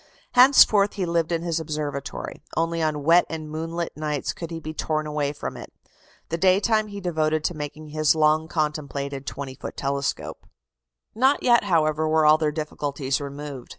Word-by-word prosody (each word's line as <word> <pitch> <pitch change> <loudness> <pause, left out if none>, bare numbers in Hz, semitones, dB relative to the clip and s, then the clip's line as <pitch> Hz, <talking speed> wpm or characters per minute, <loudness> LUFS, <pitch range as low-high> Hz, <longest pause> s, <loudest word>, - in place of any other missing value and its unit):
Henceforth 245 -6 +6
he 195 -3 -2
lived 170 -1 0
in 165 0 -1
his 165 -1 -1
observatory; 150 -3 -5 0.2
only 165 0 0
on 155 -2 -1
wet 170 +4 +6
and 155 -2 -6
moonlight 165 +2 -4
nights 150 -2 -2
could 165 - -7
he 165 -1 -5
be 155 0 -7
torn 155 -1 -2
away 150 -1 -1
from 145 - -6
it. - - -10 0.6
The 165 - -2
day 185 +1 +4
time 215 +1 +1
he 200 -1 -7
devoted 155 -4 0
to 175 - 0
making 150 +1 -7
his 155 0 +2
long 155 0 +3
contemplated 140 -3 -3
20 140 -2 -5
foot - - -8
telescope. 140 0 -3 0.7
Not 265 +5 +2
yet, 235 -3 +4
however, 155 -4 +2
were 155 0 +3
all 155 +1 +6
their 155 -1 +1
difficulties 145 -3 -3
removed. 140 -2 -7
155 Hz, 175 wpm, -24 LUFS, 150-170 Hz, 0.7 s, Henceforth